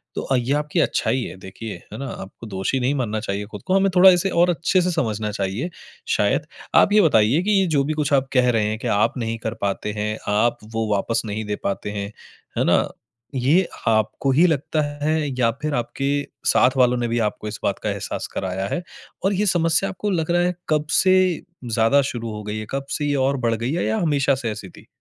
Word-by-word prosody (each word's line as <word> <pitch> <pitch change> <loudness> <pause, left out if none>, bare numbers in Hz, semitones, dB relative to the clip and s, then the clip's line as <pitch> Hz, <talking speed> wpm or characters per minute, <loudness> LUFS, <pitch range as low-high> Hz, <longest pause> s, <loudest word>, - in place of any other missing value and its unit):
तो - - -4
ये 125 +3 0
आपकी 150 +3 -1
अच्छाई 130 -1 +1
है - - -7
देखिए, 95 +4 -8 0.2
है - - -6
न? - - -4
आपको 110 -2 -8
दोषी 95 +7 -1
नहीं 130 +3 +1
मानना 110 -5 -1
चाहिए 100 -1 -3
खुद - - -8
को 185 - +1
हमें 195 0 +4
थोड़ा 190 +1 +9
इसे 180 +2 +2
और 175 +1 +3
अच्छे 175 +3 +1
से 180 0 0
समझना 110 - -1
चाहिए 100 - -2 0.4
शायद। - - +1 0.3
आप 205 - +5
ये 210 - +7
बताइए 135 - +4
कि 210 - +1
ये 190 - +2
जो 140 - +3
भी 155 - -1
कुछ 150 -1 -1
आप 135 -1 +2
कह 125 -1 +4
रहे 110 -2 +1
हैं, 110 - -2
कि - - -4
आप 105 +5 +1
नहीं 115 0 -2
कर 110 +1 -3
पाते 100 +1 -1
हैं, 105 +1 -2
आप 110 +4 +2 0.2
वो 110 -1 -1
वापस 110 +3 0
नहीं 110 +1 -3
दे 105 - -2
पाते 100 +1 -2
हैं। 100 0 -4 0.5
है - - +3
न? - - +3 0.5
ये 150 +9 +3 0.2
आपको 110 +5 +1
ही 160 +7 +5
लगता 155 0 0 0.2
है 155 +1 +2 0.2
या 115 -2 +3
फिर 150 -1 -2
आपके 120 +3 -3 0.4
साथ 130 +1 +4
वालों 125 -1 +4
ने 120 -1 -1
भी 120 0 0
आपको 105 +1 -6
इस 105 - -7
बात - - 0
का - - 0
एहसास - - -4
कराया 95 +1 -2
है? 175 - -3 0.4
और 200 - +3
ये 205 +2 +1
समस्या 170 +2 +2
आपको 205 +2 -3
लग 170 -2 0
रहा 175 0 +3
है 180 0 0
कब 150 -1 +1 0.2
से 185 0 +5 0.5
ज़्यादा 115 +5 +3
शुरू 115 -2 -5
हो 105 0 -6
गई 105 +1 -4
है? 110 - -5
कब 135 0 -3
से 150 - -2
ये 145 - +1
और 140 0 0
बढ़ 115 - +2
गई 115 +4 -2
है 175 - 0
या 220 - 0
हमेशा 145 -6 +2
से 120 -4 -3
ऐसी 100 -3 -7
थी? - - -16
125 Hz, 230 wpm, -22 LUFS, 110-160 Hz, 0.5 s, थोड़ा